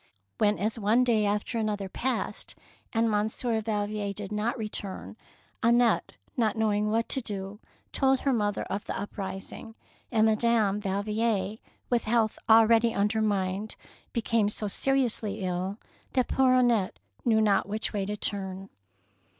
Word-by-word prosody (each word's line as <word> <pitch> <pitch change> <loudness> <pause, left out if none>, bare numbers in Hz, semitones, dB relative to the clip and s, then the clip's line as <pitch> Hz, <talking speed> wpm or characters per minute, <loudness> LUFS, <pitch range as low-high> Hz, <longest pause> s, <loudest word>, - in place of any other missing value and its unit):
When, 210 -1 +3
as 215 +3 -1
one 220 +4 +3
day 220 -4 +2
after 210 +3 -1
another 210 -3 -1
passed 255 +6 -3 0.4
and 230 0 +2
Monsieur 220 +2 0
Valvier 210 -1 -2
did 205 0 -7
not 215 +4 -1
return, 210 -4 -5 0.5
Annette, 235 +1 +3 0.2
not 225 -4 +1
knowing 210 -1 +1
what 225 +2 +1
to 265 - +2
do, 200 -2 -5 0.3
told 265 -1 +2
her 275 - +2
mother 205 -3 0
of 200 +2 -4
the - - -4
uprising, 195 +2 -6 0.4
and 220 -2 +4
Madame 220 -2 +2
Valvier, 210 +1 -1 0.3
with 240 -2 +2
health 220 -1 +1
already 225 +1 +6
undermined, 205 -1 0 0.4
became 225 -2 +1
so 210 0 -2
seriously 225 -3 0
ill 185 +2 -2 0.4
that 255 -2 +2
poor 260 -1 +4
Annette 240 -6 +2 0.3
knew 225 -2 +3
not 205 -2 +2
which 215 +3 -2
way 205 -2 -1
to 210 0 -3
turn. 195 -2 -3
215 Hz, 140 wpm, -28 LUFS, 205-230 Hz, 0.5 s, already